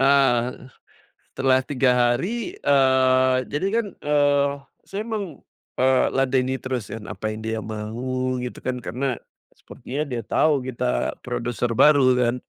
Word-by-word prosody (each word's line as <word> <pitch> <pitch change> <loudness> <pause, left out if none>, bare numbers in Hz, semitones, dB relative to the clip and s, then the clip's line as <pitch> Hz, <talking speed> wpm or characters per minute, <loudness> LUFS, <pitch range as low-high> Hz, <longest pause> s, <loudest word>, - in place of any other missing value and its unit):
Ah, 135 -3 +3 0.8
setelah 130 -1 +3
3 130 -2 +1
hari, 180 - 0
eee, 130 -2 +3 0.2
jadi 150 +6 -1
kan, 230 - -2 0.2
eee, 145 -1 +3 0.4
saya 200 +2 -3
meng 220 -3 -2 0.5
eee, 130 0 +4
ladeni 130 0 +1
terus 125 -5 -4
yang, 110 -1 -7
apa 110 0 -4
yang 110 - -7
dia 110 0 -2
mau, 125 +4 -3
gitu 125 0 -6
kan. 125 -1 -2
Karena 130 +1 -2 0.4
sepertinya 145 +4 -6
dia 120 -2 -3
tahu 145 -2 +2
kita 125 0 -1
produser 120 0 -2
baru 145 -3 +6
kan. 120 -1 +2
130 Hz, 135 wpm, -23 LUFS, 120-140 Hz, 0.8 s, baru